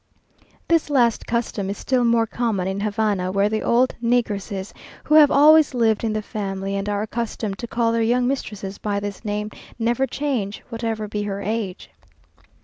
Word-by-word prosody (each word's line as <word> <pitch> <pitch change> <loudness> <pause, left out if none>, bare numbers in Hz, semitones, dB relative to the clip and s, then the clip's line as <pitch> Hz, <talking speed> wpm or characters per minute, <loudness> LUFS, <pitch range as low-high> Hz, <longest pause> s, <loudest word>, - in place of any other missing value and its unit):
This 330 -2 +2
last 240 -5 +2
custom 225 -4 -2
is 200 - -4
still 255 -2 +1
more 230 -1 +3
common 220 -5 -1
in 190 +1 -2
Havana, 205 -3 0
where 200 +2 +2
the 215 0 -1
old 250 +2 +2
negresses, 210 -5 -1 0.3
who - - -1
have 305 -2 +8
always 300 -1 +6
lived 225 -3 +2
in 225 - 0
the 215 0 -2
family, 195 -2 -4
and 200 +1 -2
are 205 0 -1
accustomed 220 -3 -4
to 235 - -5
call 230 0 +1
their 230 0 +1
young 245 +2 +2
mistress 210 -7 -4
by 205 -1 -1
this 200 0 -6
name, 210 0 -3 0.3
never 240 +3 +1
change, 250 -10 -3
whatever 225 -2 -3
be 210 0 -3
her 200 -1 -3
age. 210 -3 -4
220 Hz, 175 wpm, -22 LUFS, 200-235 Hz, 0.3 s, have